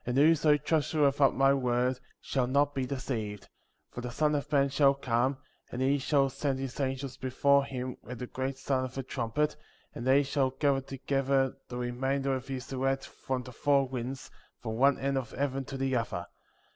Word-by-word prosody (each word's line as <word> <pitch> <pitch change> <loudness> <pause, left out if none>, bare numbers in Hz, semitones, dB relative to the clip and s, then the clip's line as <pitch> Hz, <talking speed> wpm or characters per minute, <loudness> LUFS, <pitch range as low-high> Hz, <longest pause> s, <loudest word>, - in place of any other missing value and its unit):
And 125 +1 -2
whoso 150 0 +5
treasureth 145 -2 +1
up 135 - +5
my 135 0 +5
word, 125 -1 +1 0.2
shall 130 -3 -1
not 140 +2 +2
be 130 -2 -2
deceived, 115 -7 -4 0.4
for 120 - -6
the 125 - -4
Son 150 +5 +1
of 145 0 -2
Man 140 -1 +3
shall 140 0 +4
come, 130 0 0 0.3
and 125 - -4
he 135 +2 +2
shall 135 0 +2
send 135 0 -2
his 135 0 -5
angels 135 -1 -2
before 140 +2 +3
him 130 -2 -5
with 125 - -8
the 125 - -5
great 130 +2 -4
sound 135 -1 0
of 130 - -13
a 135 - -2
trumpet, 145 +5 -1 0.4
and 120 - -5
they 135 +2 +5
shall 135 -1 +1
gather 135 +1 +1
together 135 0 0
the 125 - -5
remainder 135 +3 -1
of 130 0 -4
his 135 0 -5
elect 135 +1 0
from 130 -1 -4
the 125 - -10
four 140 +2 +2
winds, 130 +1 -5 0.3
from 110 -1 -4
one 140 +3 +4
end 135 0 0
of 125 - -7
heaven 135 -1 -2
to 135 - -6
the 135 -1 0
other. 115 -7 -2
135 Hz, 195 wpm, -30 LUFS, 125-140 Hz, 0.4 s, whoso